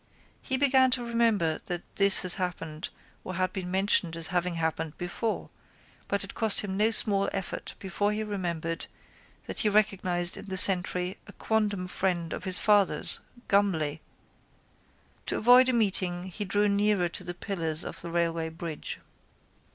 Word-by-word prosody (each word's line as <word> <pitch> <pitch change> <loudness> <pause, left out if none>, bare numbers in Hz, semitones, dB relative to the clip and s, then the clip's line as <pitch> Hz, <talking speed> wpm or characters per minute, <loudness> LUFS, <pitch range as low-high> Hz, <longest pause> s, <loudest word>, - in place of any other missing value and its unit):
He 265 - 0
began 265 -1 +4
to 240 - -7
remember 225 -9 0
that 175 -1 -5
this 200 -1 +6
had 185 - +3
happened 165 -4 -5 0.3
or 185 - -7
had 185 0 -2
been 185 -2 -6
mentioned 185 -3 +1
as 165 -1 -4
having 175 0 -1
happened 160 -1 -4
before 195 +5 -5 0.6
but 200 0 -1
it 195 - -6
cost 220 -3 +5
him 195 -2 -5
no 210 +3 +3
small 200 -3 +3
effort 195 -2 -6
before 205 +2 -2
he 215 +1 -3
remembered 170 -5 -4 0.6
that - - -5
he 215 - +2
recognised 185 -4 0
in - - -10
the 190 -1 -4
sentry 180 -1 +6
a - - -13
quondam 205 -4 -2
friend 180 -2 -3
of - - -7
his 185 -1 +1
father's, 205 -7 +3 0.3
Gumley. 160 -7 0 1.3
To - - -1
avoid 250 +3 +5
a - - 0
meeting 190 -6 +3
he 205 +3 -6
drew 205 +2 0
nearer 200 -2 +1
to - - -7
the 175 - -7
pillars 165 -6 -4
of - - -8
the 170 - -8
railway 165 -1 -2
bridge. 165 -1 -7
185 Hz, 160 wpm, -27 LUFS, 170-205 Hz, 1.3 s, this